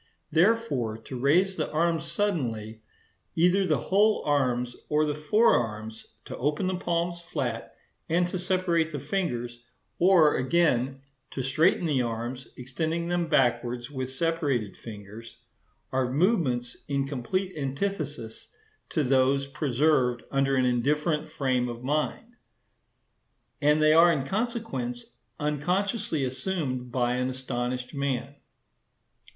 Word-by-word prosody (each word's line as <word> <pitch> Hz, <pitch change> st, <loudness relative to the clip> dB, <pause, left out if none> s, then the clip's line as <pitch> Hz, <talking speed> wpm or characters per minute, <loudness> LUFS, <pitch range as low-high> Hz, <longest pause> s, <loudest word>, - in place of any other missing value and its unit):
Therefore, 165 Hz, -, +2 dB
to 120 Hz, +3 st, -8 dB
raise 180 Hz, +9 st, +3 dB
the -, -, -1 dB
arms 165 Hz, +1 st, +1 dB
suddenly, 125 Hz, -, -2 dB, 0.5 s
either 180 Hz, +3 st, +3 dB
the 155 Hz, -, +2 dB
whole 205 Hz, -, +2 dB
arms 125 Hz, -4 st, +1 dB
or 150 Hz, 0 st, +3 dB
the 150 Hz, -, -1 dB
fore 180 Hz, +11 st, +3 dB
arms, 110 Hz, -1 st, -3 dB, 0.2 s
to -, -, -6 dB
open 150 Hz, +7 st, 0 dB
the 185 Hz, -, 0 dB
palms 170 Hz, -1 st, -1 dB
flat, 125 Hz, -9 st, -4 dB, 0.3 s
and 175 Hz, +2 st, +2 dB
to 185 Hz, -, -3 dB
separate 180 Hz, -3 st, +1 dB
the 145 Hz, -, -4 dB
fingers,—or, 150 Hz, +2 st, +1 dB
again, 135 Hz, -2 st, +1 dB, 0.3 s
to 130 Hz, -, -4 dB
straighten 155 Hz, +7 st, +2 dB
the 145 Hz, -5 st, +2 dB
arms, 120 Hz, +2 st, -4 dB
extending 160 Hz, +7 st, -2 dB
them 175 Hz, -1 st, 0 dB
backwards 120 Hz, -4 st, +1 dB
with 130 Hz, -2 st, -4 dB
separated 140 Hz, -, -1 dB
fingers,—are 115 Hz, +4 st, -7 dB
movements 135 Hz, -, +1 dB
in 140 Hz, -1 st, -1 dB
complete 180 Hz, +9 st, -2 dB
antithesis 145 Hz, -, -4 dB, 0.4 s
to 155 Hz, -, 0 dB
those 135 Hz, +1 st, +3 dB
preserved 135 Hz, -2 st, +1 dB
under 135 Hz, 0 st, +2 dB
an 130 Hz, -1 st, +3 dB
indifferent 150 Hz, +5 st, +1 dB
frame 130 Hz, -3 st, 0 dB
of 120 Hz, 0 st, -7 dB
mind, 155 Hz, -, -2 dB, 1.2 s
and 150 Hz, +1 st, +4 dB
they 155 Hz, 0 st, +5 dB
are, 170 Hz, +2 st, +7 dB
in 140 Hz, -5 st, -1 dB
consequence, 235 Hz, -, -3 dB, 0.3 s
unconsciously 165 Hz, -, 0 dB
assumed 130 Hz, -2 st, -3 dB
by 125 Hz, 0 st, +1 dB
an 125 Hz, 0 st, 0 dB
astonished 125 Hz, 0 st, -3 dB
man. 140 Hz, -1 st, -2 dB
145 Hz, 120 wpm, -27 LUFS, 125-170 Hz, 1.2 s, are